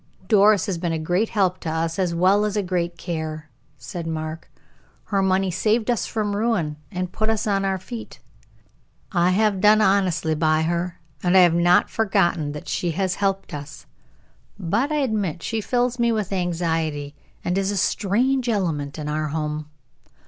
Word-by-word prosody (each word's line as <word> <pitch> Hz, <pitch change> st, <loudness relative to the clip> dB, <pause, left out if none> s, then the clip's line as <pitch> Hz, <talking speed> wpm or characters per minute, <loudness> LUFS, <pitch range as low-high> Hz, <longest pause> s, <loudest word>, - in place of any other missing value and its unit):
"Doris 205 Hz, 0 st, +5 dB
has 190 Hz, -5 st, -3 dB
been 170 Hz, -1 st, -1 dB
a -, -, 0 dB
great 175 Hz, +7 st, 0 dB
help 185 Hz, -4 st, +1 dB
to 165 Hz, -, -4 dB
us, 165 Hz, +2 st, -2 dB
as 175 Hz, -3 st, 0 dB
well 190 Hz, +4 st, +4 dB
as 210 Hz, 0 st, -1 dB
a 205 Hz, -, +1 dB
great 175 Hz, -2 st, -2 dB
care," 155 Hz, -3 st, -5 dB, 0.3 s
said 175 Hz, -4 st, -6 dB
Mark. 155 Hz, 0 st, -5 dB, 0.5 s
"Her 195 Hz, -2 st, 0 dB
money 190 Hz, 0 st, +2 dB
saved 215 Hz, +6 st, +1 dB
us 235 Hz, -6 st, -1 dB
from 210 Hz, -2 st, -2 dB
ruin, 200 Hz, -9 st, 0 dB
and 180 Hz, 0 st, -3 dB
put 215 Hz, +3 st, -1 dB
us 225 Hz, -1 st, 0 dB
on 200 Hz, -2 st, +1 dB
our 195 Hz, -1 st, 0 dB
feet. 225 Hz, +5 st, -8 dB, 0.9 s
I 175 Hz, -2 st, +3 dB
have 200 Hz, 0 st, +2 dB
done 210 Hz, +1 st, +6 dB
honestly 190 Hz, -6 st, +2 dB
by 155 Hz, 0 st, +2 dB
her, 170 Hz, +2 st, -2 dB, 0.2 s
and 180 Hz, +1 st, +2 dB
have 180 Hz, -3 st, +7 dB
not 175 Hz, +1 st, +4 dB
forgotten 175 Hz, -8 st, +1 dB
that 150 Hz, -, -8 dB
she 175 Hz, -, -1 dB
has 185 Hz, +1 st, 0 dB
helped 195 Hz, -1 st, -1 dB
us. 145 Hz, 0 st, -8 dB, 0.7 s
But 210 Hz, -, 0 dB
I -, -, +1 dB
admit 205 Hz, -, -1 dB
she 225 Hz, -1 st, -2 dB
fills 245 Hz, +2 st, 0 dB
me 235 Hz, 0 st, +3 dB
with 210 Hz, -3 st, -2 dB
anxiety, 165 Hz, -5 st, -1 dB, 0.3 s
and 180 Hz, -, 0 dB
is 195 Hz, 0 st, 0 dB
a 205 Hz, -, -1 dB
strange 240 Hz, +7 st, +1 dB
element 160 Hz, -10 st, -1 dB
in 150 Hz, -1 st, -5 dB
our 155 Hz, +1 st, -1 dB
home. 150 Hz, 0 st, -3 dB
185 Hz, 175 wpm, -23 LUFS, 165-210 Hz, 0.9 s, have